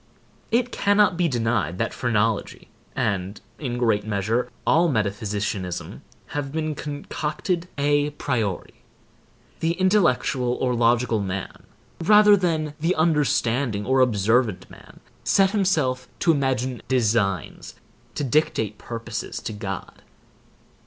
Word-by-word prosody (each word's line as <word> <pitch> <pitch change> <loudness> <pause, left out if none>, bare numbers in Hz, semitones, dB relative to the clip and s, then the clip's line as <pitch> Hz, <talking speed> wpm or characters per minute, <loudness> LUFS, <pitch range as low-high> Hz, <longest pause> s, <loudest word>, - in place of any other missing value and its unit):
It 245 +2 +1
cannot 205 -1 +3
be 175 0 +1
denied 115 - 0
that 115 - -1
phrenology 115 -2 -1 0.3
and, 100 +1 -2 0.2
in 125 -5 -3
great 110 -4 +1
measure, 110 +3 -1 0.2
all 170 +2 +4
metaphysicianism 105 - -2 0.3
have 145 -2 -4
been 155 0 -2
concocted 150 +4 -3
a 145 +1 +2
priori. 115 -10 -2 0.9
The 165 +1 +1
intellectual 170 -10 +2
or 125 -1 0
logical 120 -1 +2
man, 95 -1 -5 0.4
rather 210 +2 +7
than 160 -5 -1
the 165 +4 +1
understanding 140 -8 +1
or 130 +1 +2
observant 115 -2 +2
man, - - -15 0.2
set 195 -1 +3
himself 155 -12 +1
to 170 - +4
imagine 130 -4 -1
designs—to 115 - -2
dictate 115 -7 0
purposes 115 -1 -5
to 110 - -5
God. 95 -3 -6
125 Hz, 110 wpm, -24 LUFS, 110-155 Hz, 0.9 s, rather